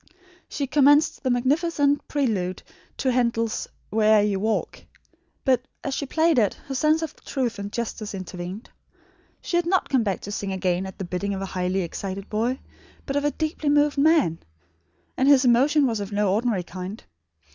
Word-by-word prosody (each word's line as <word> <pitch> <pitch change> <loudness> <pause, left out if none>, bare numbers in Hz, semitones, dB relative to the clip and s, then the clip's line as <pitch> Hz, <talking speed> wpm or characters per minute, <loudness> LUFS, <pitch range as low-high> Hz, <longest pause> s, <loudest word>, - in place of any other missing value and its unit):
She 285 - -2
commenced 290 +2 +4
the 260 - -1
magnificent 285 +3 +1
prelude 210 -11 -1 0.3
to 260 - +1
Handel's 235 -2 0 0.2
"Where'er 215 -1 +4
you 205 -2 0
walk," 220 +2 -2 0.6
but, 255 -3 +3 0.2
as 275 - -2
she 280 - -3
played 320 -1 +3
it, 210 -3 +2
her 275 - -5
sense 310 +4 +2
of 315 - -5
truth 245 -6 -2
and 200 0 -5
justice 220 -3 -4
intervened. 185 +2 -7 0.7
She 345 - -1
had 345 -1 0
not 375 +1 +1
come 265 -3 +3
back 200 -4 -1
to 205 - -7
sing 200 -1 -3
again 185 0 -1
at 190 - -10
the 195 - -4
bidding 195 +3 -2
of 190 - -5
a 195 - -7
highly 185 +1 0
excited 195 +3 -5
boy, 235 +5 0 0.5
but 275 - -3
of 285 0 +1
a - - +4
deeply 310 0 -2
moved 290 0 +3
man; 290 - +3 0.8
and 260 - +2
his 280 -2 +6
emotion 275 +5 +4
was 230 -4 0
of 200 0 -5
no 205 -1 +1
ordinary 215 -3 0
kind. 185 +4 -7
235 Hz, 180 wpm, -24 LUFS, 195-285 Hz, 0.8 s, his